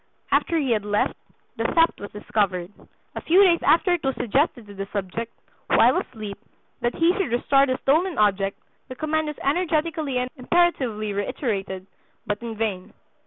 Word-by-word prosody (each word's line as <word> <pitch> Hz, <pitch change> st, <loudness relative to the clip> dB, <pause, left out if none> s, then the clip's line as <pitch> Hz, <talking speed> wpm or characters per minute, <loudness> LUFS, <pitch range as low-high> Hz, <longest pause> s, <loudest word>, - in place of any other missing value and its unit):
After 335 Hz, -, +2 dB
he 275 Hz, -5 st, 0 dB
had 215 Hz, -3 st, +1 dB
left, 210 Hz, 0 st, 0 dB, 0.4 s
the -, -, -1 dB
theft 330 Hz, 0 st, +2 dB
was 205 Hz, -, -7 dB
discovered. 200 Hz, -3 st, -1 dB, 0.4 s
A -, -, -5 dB
few 370 Hz, +5 st, +5 dB
days 345 Hz, -3 st, +4 dB
after 355 Hz, +2 st, +4 dB
it 350 Hz, -, -2 dB
was 270 Hz, -1 st, 0 dB
suggested 245 Hz, 0 st, 0 dB
to 205 Hz, -, -12 dB
the 195 Hz, 0 st, -5 dB
subject, 210 Hz, +3 st, -4 dB, 0.4 s
while -, -, +5 dB
asleep, 210 Hz, -4 st, -6 dB, 0.4 s
that 240 Hz, 0 st, -1 dB
he 335 Hz, +2 st, +3 dB
should 385 Hz, -, -2 dB
restore 275 Hz, +3 st, +3 dB
the 255 Hz, -1 st, 0 dB
stolen 330 Hz, +6 st, +2 dB
object; 200 Hz, -2 st, +1 dB, 0.3 s
the 255 Hz, -, -8 dB
command 310 Hz, +3 st, -1 dB
was 300 Hz, -, -5 dB
energetically 310 Hz, -2 st, 0 dB
and 250 Hz, 0 st, -2 dB
imperatively 250 Hz, -8 st, +1 dB
reiterated, 195 Hz, -2 st, -3 dB, 0.4 s
but 205 Hz, +1 st, -3 dB
in 230 Hz, -1 st, -5 dB
vain. 205 Hz, -5 st, -3 dB
245 Hz, 165 wpm, -24 LUFS, 205-315 Hz, 0.4 s, few